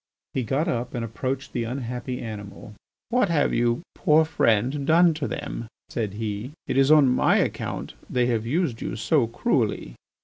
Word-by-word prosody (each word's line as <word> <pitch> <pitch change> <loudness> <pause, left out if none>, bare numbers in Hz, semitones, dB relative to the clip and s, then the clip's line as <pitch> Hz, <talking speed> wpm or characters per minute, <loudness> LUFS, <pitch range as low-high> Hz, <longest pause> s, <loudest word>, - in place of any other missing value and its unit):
He 130 - 0
got 135 +8 0
up 125 -4 -2
and 120 -1 -2
approached 130 +4 -4
the 120 - -1
unhappy 125 +1 -4
animal. 105 -1 -8 0.4
"What 235 -4 +2
have 150 -4 +2
you, 120 +4 +1
poor 160 -2 +4
friend, 130 -1 +1
done 170 +1 +5
to 155 -2 -3
them?" 145 -5 -5 0.2
said 105 -4 -3
he. 110 +4 -4
"It - - -2
is 135 +1 +4
on 150 -3 +7
my 125 - +3
account - - -2 0.2
they 125 -1 +2
have 115 -3 0
used 130 -1 -1
you - - -3
so 115 +3 +2
cruelly." 110 - -1
125 Hz, 170 wpm, -25 LUFS, 115-145 Hz, 0.4 s, on